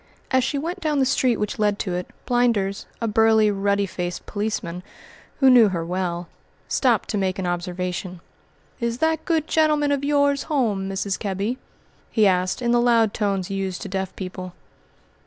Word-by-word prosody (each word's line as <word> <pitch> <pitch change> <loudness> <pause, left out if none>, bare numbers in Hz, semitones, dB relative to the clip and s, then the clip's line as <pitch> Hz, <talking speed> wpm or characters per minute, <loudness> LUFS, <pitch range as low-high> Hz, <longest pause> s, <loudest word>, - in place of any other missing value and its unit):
As 260 -1 +3
she 275 +3 -1
went 340 +6 -3
down 310 -4 0
the 270 - +3
street 255 -3 +2
which 210 0 -3
led 205 -1 +2
to 185 -4 -3
it, 180 0 -3 0.2
Blinders, 230 -6 +1
a 230 - -1
burly, 220 -1 +4
ruddy 200 0 +1
faced 180 -2 -5
policeman, 205 -4 -3 0.6
who 270 - +5
knew 245 -4 +8
her 170 -3 -3
well, 175 -1 -2 0.4
stopped 245 -5 +2
to 210 - -1
make 190 -1 -1
an 190 - -3
observation. 180 +1 -3 0.6
"Is 235 -1 -1
that 320 +2 0
good 325 -3 +1
gentleman 300 -2 +2
of 280 -1 0
yours 285 -1 +2
home, 215 -10 0
Mrs. 195 0 -2
Kebby?" 205 +5 -2 0.5
he 220 -3 +3
asked, 185 +4 +1
in 235 - +2
the 240 0 +4
loud 230 -3 +3
tones 195 -3 -1
used 195 -2 -3
to 200 - -6
deaf 190 0 -3
people. 185 -1 -6
210 Hz, 175 wpm, -23 LUFS, 190-255 Hz, 0.6 s, knew